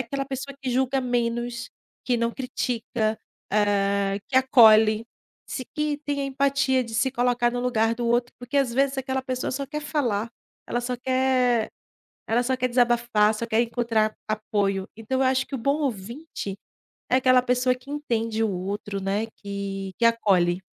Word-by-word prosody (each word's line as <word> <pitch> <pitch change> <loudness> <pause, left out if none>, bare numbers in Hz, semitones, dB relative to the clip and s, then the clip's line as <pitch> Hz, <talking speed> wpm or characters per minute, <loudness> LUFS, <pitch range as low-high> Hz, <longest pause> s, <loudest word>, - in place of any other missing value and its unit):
aquela 275 +3 -3
pessoa 275 +1 -6
que 265 -2 -3
julga 265 +2 +1
menos, 240 -1 -2 0.4
que 245 - +1
não 235 0 0
critica, 235 -3 -2 0.3
hã, 200 -1 +2
que 260 - 0
acolhe, 220 -4 +6 0.4
se 255 - -5
que 300 -1 0
tem 285 -1 -1
empatia 270 -1 +2
de 230 -1 -8
se 255 +4 +2
colocar 245 -1 +1
no 245 - -3
lugar 230 -2 +1
do 240 0 -3
outro, 240 +1 +1
porque 245 +3 -5
às 270 -4 +2
vezes 275 +1 +1
aquela 265 0 -2
pessoa 255 -1 -3
só 275 +1 -3
quer 300 +2 -4
falar, 240 -8 -1 0.3
ela 240 - -2
só 245 +1 -3
quer 255 -2 +1 0.6
ela 230 +2 +2
só 260 +1 0
quer 255 0 -1
desabafar, 240 -3 +3
só 230 - -3
quer 225 -1 +1
encontrar 230 -2 0
apoio, 205 -3 -1
então 225 +4 -2
eu 265 - +3
acho 260 0 +1
que - - -14
o - - -3
bom 280 +6 0
ouvinte 235 -3 -4 0.5
é - - +3
aquela 255 -1 +5
pessoa 250 0 +2
que 250 +2 -14
entende 230 -6 -1
o 220 - +1
outro, 200 +2 -4
né, 200 +3 -1
que 195 -1 -5
que 235 - -2
acolhe. 195 -7 +3
240 Hz, 170 wpm, -25 LUFS, 220-260 Hz, 0.6 s, acolhe